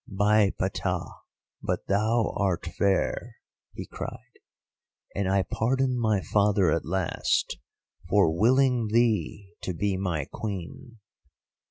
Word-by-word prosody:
"'By 105 +1 +3
Ptah, - - -2 0.5
but - - -2
thou 110 +3 +1
art 95 -4 0
fair,' 95 +2 0 0.4
he - - -6
cried, - - -9 0.7
'and 100 -1 -1
I 95 0 +2
pardon 130 +7 0
my 110 -5 +1
father 100 -4 +2
at 85 - 0
last 90 +1 -1 0.5
for 95 -5 +4
willing 125 +3 +3
thee 105 -3 0
to 90 - -4
be 100 +2 0
my 85 -7 -2
Queen! 105 - -7
100 Hz, 115 wpm, -27 LUFS, 95-110 Hz, 0.7 s, for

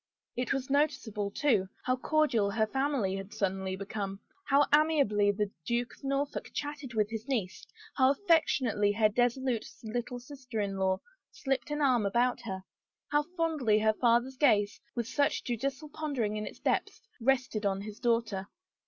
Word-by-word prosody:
It 250 +1 -1
was 270 0 -1
noticeable, 245 -8 +1
too, 205 -5 +1 0.2
how 255 - +2
cordial 260 -7 +2
her 220 +2 +1
family 265 -5 0
had 195 +1 -7
suddenly 190 -1 -1
become, 200 0 -4 0.3
how 285 +1 +5
amiably 285 -10 +4
the 205 0 -2
Duke 240 +3 -1
of - - -25
Norfolk 275 +1 -2
chatted 290 -4 -4
with 215 0 +1
his 225 +2 -5
niece, 220 -9 -2 0.3
how 260 -1 +5
affectionately 270 - +2
her 215 0 +4
dissolute 245 +1 0 0.2
little 240 +2 -3
sister 255 -3 -7
in 200 -1 -1
law 190 0 +2 0.3
slipped 270 -2 -2
an 295 0 -2
arm 250 -7 +3
about 240 +4 +1
her, 190 -4 -5 0.5
how 295 0 +4 0.2
fondly 305 -10 +2
her 215 0 +3
father's 240 +3 +2
gaze, 210 -8 +3
with 235 -2 -2
such 285 +3 +1
judicial 270 +5 -3
pondering 280 -9 -2
in 215 0 -3
its - - -9
depths, - - -1 0.2
rested 250 -3 +1
on 195 -1 0
his 210 +1 -8
daughter. 230 -5 0
240 Hz, 160 wpm, -30 LUFS, 210-275 Hz, 0.5 s, how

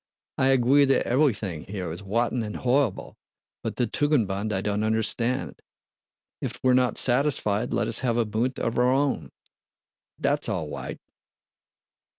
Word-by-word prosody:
"I 130 - +3
agwee 135 +2 +4
that 135 - +2
evewything 110 - 0
here 95 -4 -4
is 85 - -6
wotten 115 +5 0
and 105 -2 -5
howwible, 130 +3 0 0.4
but - - -4
the 125 - +1
Tugendbund 110 -9 0
I 95 - 0
don't 105 +1 -1
understand. 110 +3 -1 0.8
If 125 -2 -4
we're 130 -1 +4
not 125 -2 +2
satisfied, 120 -4 +1
let - - 0
us - - +1
have 120 -3 0
a 120 - +2
bunt 115 +5 -1
of 115 +1 -1
our 125 +1 +4
own. 140 +1 0 0.9
That's 145 -1 +1
all 85 -7 -2
wight. - - -6
120 Hz, 150 wpm, -25 LUFS, 105-130 Hz, 0.9 s, agwee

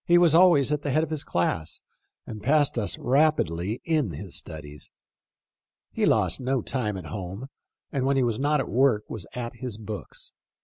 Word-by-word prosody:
He 175 0 +5
was 175 -3 +5
always 165 -5 +5
at 150 - -1
the 145 - -3
head 155 +4 +2
of 160 - -4
his 155 -2 -2
class, 80 -2 -2 0.4
and 110 -1 -8
passed 145 +5 +3
us 105 - -2
rapidly 120 - +1
in 155 - +1
his - - -6
studies. 75 -2 -6 1.0
He - - +1
lost - - +2
no 130 0 -1
time 105 -7 -2
at 90 - -8
home, 95 - -6 0.4
and 135 - -1
when 135 +1 +2
he 130 - +3
was 115 -2 0
not 145 +2 +2
at - - -2
work 125 -4 +3
was 105 -6 -5
at 120 -1 -5
his 125 -5 -5
books. 110 -1 -7
130 Hz, 185 wpm, -26 LUFS, 105-145 Hz, 1.0 s, He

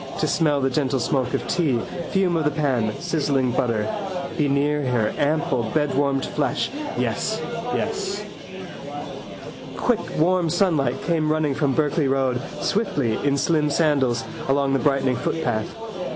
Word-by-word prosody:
To - - +2
smell 150 -5 +2
the 135 0 +1
gentle 135 -1 +1
smoke 125 0 0
of - - -3
tea, 160 -9 +2 0.3
fume 190 -3 +2
of 160 - +1
the 150 - +3
pan, 130 -8 0
sizzling 145 -7 +1
butter. 115 -4 0 0.5
Be 150 -4 +1
near 145 +2 +2
her 120 -5 +1
ample 145 -6 +1
bedwarmed 140 -2 +1
flesh. 145 -2 -1 0.3
Yes, - - -1 0.4
yes. - - -2 1.5
Quick 245 -3 +2 0.2
warm 175 +1 +3
sunlight 155 -8 +1
came 160 -3 +1
running 155 -2 +1
from 140 -1 +1
Berkeley 150 -1 +2
road, 130 -2 +1 0.2
swiftly, 145 - 0
in 140 -1 +2
slim 150 0 +2
sandals, 140 -6 +2 0.3
along 140 0 +2
the 135 - +3
brightening 135 -3 +2
footpath. 120 -9 -1
140 Hz, 135 wpm, -23 LUFS, 130-155 Hz, 1.5 s, the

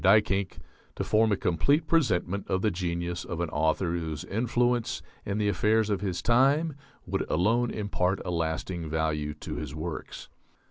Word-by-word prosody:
Duyckinck 100 -1 +3 0.4
to - - -2
form 110 0 +3
a 100 - +2
complete 120 - +2
presentment 100 - +1
of 95 0 0
the 110 - +3
genius 85 -1 -2
of 85 - -5
an 85 -2 -1
author 80 +4 +1
whose 80 -4 -3
influence 120 +2 0 0.2
in 100 +1 -1
the 105 -1 +1
affairs 105 +3 +2
of 100 -2 0
his 95 -4 -2
time 140 +7 +3 0.3
would - - -1
alone 115 +9 +2
impart 100 -2 -1
a - - -2
lasting 85 0 -2
value 75 -2 -1
to - - -6
his 75 -1 -5
works." 80 +1 -6
95 Hz, 160 wpm, -28 LUFS, 85-110 Hz, 0.4 s, Duyckinck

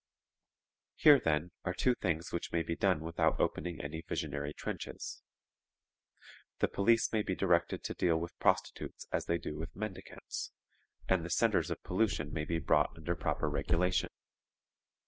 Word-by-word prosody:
"Here, 145 -3 +8
then, 80 +2 0
are 90 0 -2
two 125 - +3
things 85 -7 -2
which 85 - -3
may 85 -1 +1
be 85 +1 -2
done 95 -5 +2
without 80 +1 +1
opening 85 -2 -1
any 75 +3 -5
visionary 70 -2 -3
trenches. - - -6 1.4
The - - +2
police 115 +4 +3
may 110 - +3
be 95 -2 -2
directed 85 -3 +2
to - - -3
deal 85 -2 +2
with 85 +1 -5
prostitutes - - 0
as - - 0
they 85 - +1
do 75 -2 -6
with 80 0 -6
mendicants, 105 -2 -6 0.6
and 95 -3 +2
the 85 - -5
centres - - +2
of - - -4
pollution 90 -6 0
may 75 -1 -2
be 85 +1 -1
brought 80 - +2
under 80 +2 -2
proper - - -1
regulation. 90 +3 +1
85 Hz, 155 wpm, -33 LUFS, 80-95 Hz, 1.4 s, Here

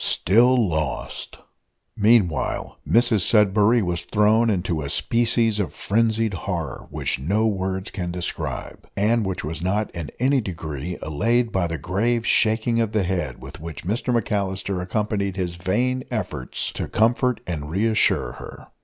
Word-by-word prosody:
STILL 120 +3 +4
LOST! 80 -6 -3 0.6
Meanwhile, 105 - +2
Mrs 115 -1 +4
Sudberry 105 +3 +4
was 85 -2 -1
thrown 110 +4 +3
into 90 -5 -1
a 70 - -4
species 115 - +2
of 90 -8 -2
frenzied 110 0 +1
horror, 90 - -4
which - - -2
no 100 +11 +1
words 95 -2 -2
can 90 -2 -4
describe, 90 0 -5
and 110 +3 +2
which 95 - -3
was 80 +2 -4
not 100 +4 -1
in 85 -4 -6
any 135 +2 +2
degree 80 - -5
allayed 115 +10 +1
by 90 -2 0
the 80 0 -3
grave 115 - 0
shaking 115 +1 +2
of 110 -2 -1
the 105 -3 +2
head, 90 -1 -2
with 70 +2 -10
which 85 +1 -8
Mr 115 +6 -1
McAllister 100 -4 -1
accompanied 100 0 -1
his 90 -2 -2
vain 120 +9 0
efforts 60 - -3
to - - -4
comfort 120 +2 +2
and 75 -4 -4
re 95 +7 0
assure 110 -1 +2
her. - - -11
100 Hz, 150 wpm, -23 LUFS, 90-115 Hz, 0.6 s, STILL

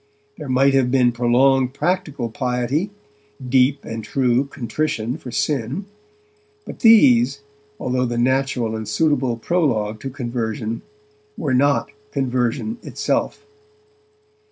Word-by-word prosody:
There 150 -3 -7
might 135 +2 +3
have 135 -2 +3
been 125 -2 +3
prolonged 130 +2 +2
practical 145 -9 -1
piety, 125 - -1 0.6
deep 130 +2 +2
and 115 0 -5
true 125 +2 +1
contrition 125 -2 -3
for 125 - -9
sin, 140 - -2 0.8
but - - -9
these, 140 - +5 0.4
although 125 0 0
the 120 0 -3
natural 125 -2 0
and 110 -1 -5
suitable 130 0 +1
prologue 115 -8 0
to 135 - -5
conversion, 115 -3 -4 0.6
were 145 -5 -1
not 140 +2 +2 0.2
conversion 130 - -1
itself. 430 - -2
130 Hz, 110 wpm, -21 LUFS, 120-140 Hz, 0.8 s, these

